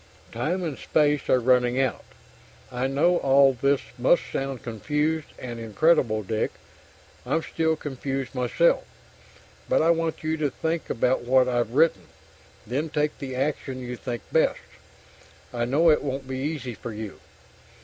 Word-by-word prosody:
Time 165 Hz, +11 st, -2 dB
and 155 Hz, -5 st, -4 dB
space 150 Hz, -2 st, +1 dB
are 130 Hz, -, +5 dB
running 125 Hz, 0 st, +3 dB
out. 130 Hz, -2 st, 0 dB, 0.7 s
I 125 Hz, +1 st, -1 dB
know 155 Hz, +6 st, +3 dB
all 135 Hz, -1 st, +5 dB
this 140 Hz, +2 st, +1 dB, 0.2 s
must 140 Hz, +7 st, +4 dB
sound 135 Hz, -2 st, -3 dB
confused 150 Hz, +7 st, -1 dB
and 120 Hz, -2 st, -7 dB
incredible, 115 Hz, -, +2 dB
Dick; 110 Hz, +2 st, -2 dB, 0.7 s
I'm 160 Hz, +1 st, 0 dB
still 160 Hz, -1 st, 0 dB
confused 135 Hz, -2 st, -4 dB
myself. 125 Hz, +6 st, +2 dB, 0.9 s
But -, -, +3 dB
I 165 Hz, -, +5 dB
want 165 Hz, -1 st, -1 dB
you 160 Hz, +1 st, -1 dB
to 150 Hz, -2 st, 0 dB
think 160 Hz, +4 st, -3 dB
about 125 Hz, +2 st, +1 dB
what 130 Hz, +1 st, +3 dB
I've 120 Hz, -1 st, -1 dB
written, 150 Hz, -, +3 dB, 0.6 s
then 140 Hz, +8 st, -2 dB
take 150 Hz, 0 st, -1 dB
the 130 Hz, -3 st, -5 dB
action 135 Hz, -1 st, -2 dB
you 125 Hz, -1 st, -5 dB
think 120 Hz, -2 st, -5 dB
best. -, -, +3 dB, 1.0 s
I 120 Hz, -1 st, -1 dB
know 155 Hz, +7 st, +4 dB
it 150 Hz, -, +3 dB
won't 135 Hz, -1 st, -4 dB
be 130 Hz, 0 st, -4 dB
easy 135 Hz, -3 st, -3 dB
for 115 Hz, +1 st, -7 dB
you. 105 Hz, -2 st, -7 dB
135 Hz, 150 wpm, -25 LUFS, 125-155 Hz, 1.0 s, are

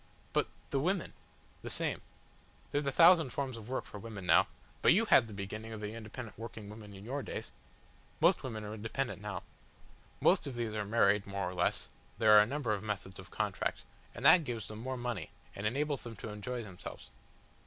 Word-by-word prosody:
"But -, -, +2 dB, 0.2 s
the 135 Hz, -, +2 dB
women?" 180 Hz, +5 st, 0 dB, 0.5 s
"The -, -, -6 dB
same. -, -, -1 dB, 0.7 s
There's 145 Hz, 0 st, 0 dB
a -, -, +2 dB
thousand 165 Hz, -1 st, +7 dB
forms 135 Hz, -1 st, -3 dB
of 115 Hz, 0 st, -9 dB
work 130 Hz, -, -2 dB
for 105 Hz, -, -9 dB
women 105 Hz, -3 st, -7 dB
now. -, -, +6 dB, 0.3 s
But -, -, +7 dB
you -, -, +4 dB
had 115 Hz, -, +6 dB
the -, -, -10 dB
beginning 105 Hz, +3 st, -5 dB
of 110 Hz, -, -6 dB
the 105 Hz, 0 st, -4 dB
independent 115 Hz, 0 st, -8 dB
working 115 Hz, -2 st, -7 dB
woman 105 Hz, -2 st, -10 dB
in 95 Hz, +1 st, -10 dB
your 135 Hz, +4 st, -2 dB
days. -, -, -5 dB, 0.7 s
Most -, -, +5 dB
women 110 Hz, -4 st, -5 dB
are 105 Hz, 0 st, -5 dB
independent 110 Hz, -1 st, -3 dB
now. 100 Hz, -4 st, -4 dB, 0.8 s
Most -, -, +4 dB
of 135 Hz, -, -5 dB
these 115 Hz, -2 st, -2 dB
are 105 Hz, -1 st, -2 dB
married 105 Hz, -2 st, +3 dB
more 100 Hz, -2 st, -2 dB
or 90 Hz, -, -4 dB
less 90 Hz, -1 st, 0 dB, 0.3 s
there 110 Hz, 0 st, +7 dB
are -, -, +11 dB
a 105 Hz, -, +3 dB
number 135 Hz, -4 st, -1 dB
of 100 Hz, -, -2 dB
methods 100 Hz, -3 st, -4 dB
of -, -, -10 dB
contract -, -, -2 dB, 0.3 s
and -, -, -5 dB
that 180 Hz, -, +9 dB
gives 120 Hz, -5 st, -4 dB
them 110 Hz, 0 st, -7 dB
more 130 Hz, +2 st, -3 dB
money, 120 Hz, -9 st, -3 dB, 0.3 s
and 100 Hz, +2 st, -1 dB
enables 145 Hz, +4 st, 0 dB
them 115 Hz, -1 st, -8 dB
to 110 Hz, -, -7 dB
enjoy 120 Hz, +4 st, -4 dB
themselves." 95 Hz, -4 st, -9 dB
110 Hz, 205 wpm, -33 LUFS, 105-125 Hz, 0.8 s, are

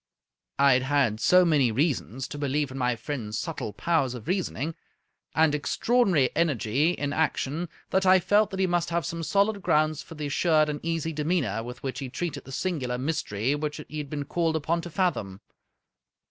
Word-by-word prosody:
I 140 Hz, -1 st, +6 dB
had 125 Hz, -, +3 dB
had 130 Hz, -5 st, +1 dB
so 180 Hz, +8 st, +5 dB
many 145 Hz, -8 st, +3 dB
reasons 130 Hz, -, -1 dB
to 145 Hz, -, -6 dB
believe 145 Hz, 0 st, -1 dB
in 130 Hz, -, -7 dB
my 125 Hz, -1 st, +1 dB
friend's 115 Hz, -3 st, -5 dB
subtle -, -, -4 dB
powers 140 Hz, -2 st, 0 dB
of 115 Hz, -3 st, -9 dB
reasoning, 170 Hz, -4 st, -1 dB, 0.6 s
and 160 Hz, -2 st, +4 dB
extraordinary 175 Hz, -, +2 dB
energy 150 Hz, -1 st, +1 dB
in 145 Hz, -4 st, -3 dB
action, 155 Hz, +1 st, -1 dB, 0.2 s
that 190 Hz, -, +2 dB
I 185 Hz, 0 st, +6 dB
felt 205 Hz, +4 st, +3 dB
that 190 Hz, -, -5 dB
he 190 Hz, -, +3 dB
must 175 Hz, -1 st, 0 dB
have 170 Hz, -2 st, -1 dB
some 165 Hz, +3 st, -4 dB
solid 200 Hz, +6 st, +1 dB
grounds 155 Hz, -2 st, +2 dB
for 165 Hz, -, -11 dB
the 150 Hz, -1 st, -4 dB
assured 155 Hz, +1 st, +2 dB
and 145 Hz, -1 st, -3 dB
easy 165 Hz, -1 st, -2 dB
demeanor 150 Hz, -, 0 dB
with 125 Hz, +2 st, -9 dB
which 130 Hz, -1 st, -3 dB
he 135 Hz, -2 st, -5 dB
treated 175 Hz, +5 st, -4 dB
the 135 Hz, -, -10 dB
singular 135 Hz, -6 st, -2 dB
mystery 130 Hz, -4 st, -1 dB
which 150 Hz, 0 st, -3 dB
he 155 Hz, -, -5 dB
had 145 Hz, -2 st, -5 dB
been 145 Hz, -1 st, -4 dB
called 165 Hz, +1 st, 0 dB
upon 160 Hz, +2 st, 0 dB
to 175 Hz, -, -7 dB
fathom. 150 Hz, -, -1 dB
150 Hz, 190 wpm, -27 LUFS, 130-170 Hz, 0.6 s, I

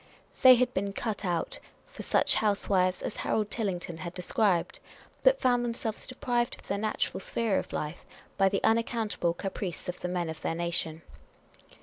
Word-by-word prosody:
They 255 Hz, -1 st, +10 dB
had 250 Hz, +1 st, +1 dB
been 195 Hz, +1 st, -1 dB
cut 220 Hz, 0 st, -3 dB
out 175 Hz, -3 st, -1 dB, 0.3 s
for -, -, -10 dB
such -, -, +2 dB
housewives 195 Hz, -3 st, +2 dB
as -, -, -4 dB
Harold 210 Hz, -1 st, 0 dB
Tillington 180 Hz, -6 st, -2 dB
had 170 Hz, +2 st, -6 dB
described, 180 Hz, 0 st, +1 dB, 0.4 s
but -, -, +5 dB
found 245 Hz, -1 st, +3 dB
themselves 230 Hz, -2 st, -3 dB
deprived 245 Hz, -2 st, -1 dB
of -, -, -17 dB
their 200 Hz, -, -1 dB
natural 215 Hz, 0 st, -1 dB
sphere 215 Hz, +1 st, 0 dB
in -, -, -4 dB
life 150 Hz, +3 st, -4 dB, 0.3 s
by 195 Hz, -1 st, +4 dB
the 195 Hz, 0 st, -1 dB
unaccountable 225 Hz, -6 st, +1 dB
caprice 190 Hz, -2 st, -4 dB
of 180 Hz, -, -4 dB
the -, -, -3 dB
men 175 Hz, -1 st, -1 dB
of 160 Hz, -1 st, -6 dB
their 165 Hz, -, -1 dB
nation. 165 Hz, -1 st, -2 dB
200 Hz, 165 wpm, -29 LUFS, 175-230 Hz, 0.4 s, They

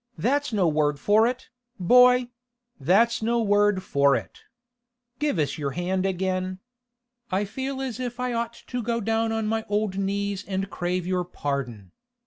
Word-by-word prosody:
That's 285 Hz, +3 st, 0 dB
no 200 Hz, -5 st, +2 dB
word 150 Hz, -2 st, +1 dB
for 215 Hz, +9 st, +4 dB
it, 250 Hz, +1 st, -4 dB, 0.3 s
boy; 250 Hz, +5 st, +5 dB, 0.5 s
that's 205 Hz, -, +3 dB
no 235 Hz, +2 st, +1 dB
word 205 Hz, -3 st, +2 dB
for 140 Hz, -5 st, +3 dB
it! -, -, -6 dB, 0.8 s
Give 295 Hz, -8 st, 0 dB
us 150 Hz, -1 st, -1 dB
your 140 Hz, -2 st, -2 dB
hand 185 Hz, +2 st, 0 dB
again. 185 Hz, 0 st, -2 dB, 0.7 s
I 195 Hz, +3 st, +1 dB
feel 265 Hz, +6 st, -4 dB
as 255 Hz, -2 st, -4 dB
if 245 Hz, -1 st, -4 dB
I'd 250 Hz, -1 st, -1 dB
ought 235 Hz, 0 st, -2 dB
to 250 Hz, -1 st, -3 dB
go 235 Hz, +1 st, -1 dB
down 225 Hz, +1 st, 0 dB
on 225 Hz, -1 st, -1 dB
my 220 Hz, +1 st, -1 dB
old 205 Hz, -2 st, 0 dB
knees 200 Hz, 0 st, -2 dB
and 195 Hz, 0 st, -3 dB
crave 180 Hz, 0 st, -2 dB
your 180 Hz, 0 st, 0 dB
pardon. 135 Hz, -, -4 dB
200 Hz, 160 wpm, -25 LUFS, 180-235 Hz, 0.8 s, boy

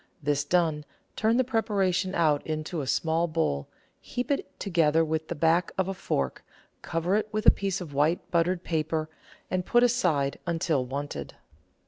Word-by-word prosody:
This 145 Hz, 0 st, +1 dB
done, 160 Hz, -2 st, +1 dB, 0.3 s
turn 225 Hz, +2 st, +2 dB
the 255 Hz, -, +4 dB
preparation 195 Hz, -6 st, 0 dB
out 155 Hz, -4 st, +2 dB
into 155 Hz, +1 st, -3 dB
a 135 Hz, -, -5 dB
small 165 Hz, +4 st, +1 dB
bowl, 155 Hz, -, -1 dB, 0.3 s
heap 245 Hz, +2 st, -4 dB
it 280 Hz, -, -3 dB
together 165 Hz, -4 st, +2 dB
with 160 Hz, 0 st, -2 dB
the 170 Hz, -, -4 dB
back 165 Hz, +3 st, +2 dB
of 190 Hz, -1 st, +1 dB
a 195 Hz, -, -2 dB
fork, 70 Hz, -, -2 dB, 0.4 s
cover 165 Hz, +3 st, -1 dB
it 215 Hz, 0 st, -2 dB
with 215 Hz, 0 st, -2 dB
a -, -, +10 dB
piece 195 Hz, -2 st, -2 dB
of 160 Hz, -5 st, -7 dB
white, 155 Hz, +6 st, +1 dB
buttered 175 Hz, +1 st, +1 dB
paper, 155 Hz, -1 st, -1 dB, 0.4 s
and 185 Hz, -1 st, 0 dB
put 240 Hz, +6 st, +3 dB
aside 175 Hz, -, +1 dB
until 165 Hz, -5 st, +1 dB
wanted. 140 Hz, +3 st, -5 dB
165 Hz, 165 wpm, -27 LUFS, 155-190 Hz, 0.4 s, a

